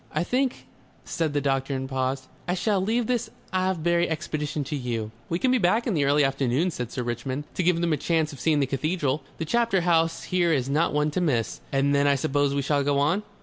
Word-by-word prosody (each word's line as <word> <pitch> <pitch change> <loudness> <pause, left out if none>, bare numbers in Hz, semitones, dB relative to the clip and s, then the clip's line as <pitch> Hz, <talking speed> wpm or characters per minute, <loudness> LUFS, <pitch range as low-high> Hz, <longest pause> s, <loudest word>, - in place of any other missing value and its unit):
"I 155 - 0
think," 255 +6 -1 0.4
said 160 -4 -1
the 145 - +1
doctor 135 0 0
and 130 0 -3
paused. 130 0 -2 0.2
"I 180 - +1
shall 200 0 +1
leave 225 +5 +1
this 240 -1 -1 0.2
Avebury 175 -2 +1
expedition 155 -2 -3
to 150 - -4
you." 115 -5 -3 0.2
"We 170 - 0
can 255 +7 +1
be 255 - +3
back 215 +5 +2
in 230 - 0
the 145 -4 +2
early 145 +1 +4
afternoon," 135 +5 +1
said 125 -6 -5
Sir 125 - -3
Richmond. 120 +4 -3
"To - - -1
give 175 -1 +2
them 170 -2 +1
a - - +1
chance 160 0 0
of 140 - -10
seeing 155 -3 +2
the - - +3
cathedral. 145 +1 -1 0.2
The 165 - -3
chapter 230 +1 +2
house 165 -1 +2
here 175 -2 +1
is 130 -3 0
not 155 +4 +2
one 150 +1 +1
to 180 - -1
miss...." 125 -10 0
"And 140 +1 +2
then 140 0 +3
I 140 - +4
suppose 140 +1 +1
we 140 - 0
shall 145 +1 +1
go 140 0 +1
on? 155 +8 +2
150 Hz, 230 wpm, -25 LUFS, 135-175 Hz, 0.4 s, early